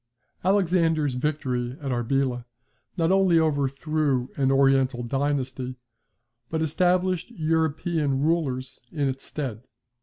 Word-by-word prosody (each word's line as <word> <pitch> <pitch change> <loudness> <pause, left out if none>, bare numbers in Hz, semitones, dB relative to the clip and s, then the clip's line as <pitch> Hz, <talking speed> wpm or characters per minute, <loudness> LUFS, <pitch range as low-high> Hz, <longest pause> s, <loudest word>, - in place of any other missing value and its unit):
Alexander's 170 -6 +2
victory 125 -3 -2
at 140 -3 -4
Arbela 125 0 0 0.5
not 165 0 +2
only 190 -3 +4
overthrew 145 -2 0
an 135 -1 +2
Oriental 135 -2 +3
dynasty, 130 0 -2 0.7
but 160 - -1
established 180 +4 +1
European 160 - 0
rulers 140 -5 -1
in 145 -3 0
its 135 0 -3
stead. 130 -8 -4
145 Hz, 100 wpm, -25 LUFS, 130-160 Hz, 0.7 s, only